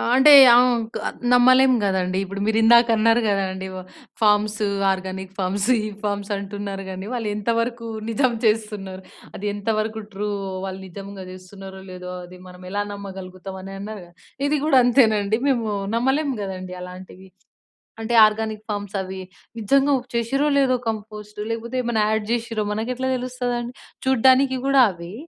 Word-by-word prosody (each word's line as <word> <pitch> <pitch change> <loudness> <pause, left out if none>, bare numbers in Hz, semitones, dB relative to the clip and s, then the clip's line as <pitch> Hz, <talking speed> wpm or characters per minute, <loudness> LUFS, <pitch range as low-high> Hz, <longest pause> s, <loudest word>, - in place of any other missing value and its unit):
అంటే 270 +3 +7 0.2
ఆంక్ 240 -2 +2 0.4
నమ్మలేం 255 +1 +6
గదండీ. 185 -1 0
ఇప్పుడు 195 +1 -6
మీరు 220 0 +1
ఇందాక 235 +1 +6
అన్నారు 230 +2 +3
గదండీ. 190 -2 -1
వ - - -5 0.4
ఫార్మ్స్, 210 0 +2 0.3
ఆర్గానిక్ 190 0 -5
ఫార్మ్స్ 195 +2 -1
ఈ - - -1 0.2
ఫార్మ్స్ 205 0 -3
అంటున్నారు 200 -1 -6
గానీ 190 +1 -7
వాళ్ళు 235 -3 -3 2.1
అది 210 - -4
ఎంత 205 +2 -4
వరకు 220 0 -4
ట్రూ 205 +2 -3 0.4
వాళ్ళు 190 0 -6
నిజంగా 195 +1 -9
జేస్తున్నారో 190 +1 -11
లేదో 180 0 -8
అది 180 +1 -12
మనం 180 0 -13
ఎలా 205 - -1
నమ్మగలుగుతాం 190 -1 -8
అని 195 +1 -9
అన్నారుగా. 200 -4 -8 0.4
ఇది 300 - +1
గూడా 295 -4 +4
అంతేనండి. 220 -4 +3
మేము 235 -4 0 0.3
నమ్మలేము 270 +4 +1
గదండీ 185 -1 -6
అలాంటివి. 185 +1 -11 0.7
అంటే 225 +2 -3
ఆర్గానిక్ 215 0 -2
ఫామ్స్ 205 -1 -4
అవి 190 0 -5 0.4
నిజంగా 275 +6 +3 0.2
చేసిర్రో 255 +5 0
లేదో 265 -2 +3
కంపోస్ట్ 210 -1 -7
లేకపోతే 230 +2 -4
ఏమైనా 235 -3 0
యాడ్ 220 -1 0
జేసిర్రో 230 -2 -1
మనకెట్లా 250 +5 -3
తెలుస్తుందండి? 245 -1 -3 0.3
చూడ్డానికి 260 +1 +4
గూడా 275 -1 +5
అవ్వి 170 -1 -9
210 Hz, 135 wpm, -22 LUFS, 190-240 Hz, 2.1 s, అంటే